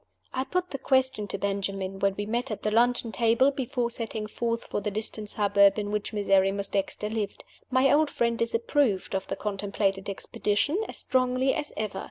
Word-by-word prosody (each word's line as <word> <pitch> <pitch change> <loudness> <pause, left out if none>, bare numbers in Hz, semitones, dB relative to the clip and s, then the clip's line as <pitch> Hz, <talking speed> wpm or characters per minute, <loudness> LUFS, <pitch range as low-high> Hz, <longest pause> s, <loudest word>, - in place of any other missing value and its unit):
I 260 +1 -1
put 360 +3 -2
the 275 - -4
question 260 -6 +1
to - - -3
Benjamin 195 -1 -2
when 195 0 +1
we 205 - -3
met 240 +4 -1
at 215 - -5
the 215 - 0
luncheon 240 +1 +3
table 235 +6 +3
before 245 -3 -2
setting 225 -2 -4
forth 230 +2 -2
for - - -3
the 210 - -1
distant 215 0 -4
suburb 200 -1 +4
in 205 -1 -2
which 210 -1 -2
Miserrimus 195 -1 +2
Dexter 200 +1 -1
lived. 215 -2 -3 0.3
My 260 0 +4
old 305 0 +4
friend 235 -3 0
disapproved 230 -2 0
of 190 0 -2
the - - -2
contemplated 200 -1 -1
expedition 210 - -1
as - - -3
strongly 255 0 +1
as 300 -2 -2
ever. 210 -3 -3
215 Hz, 185 wpm, -27 LUFS, 200-250 Hz, 0.3 s, suburb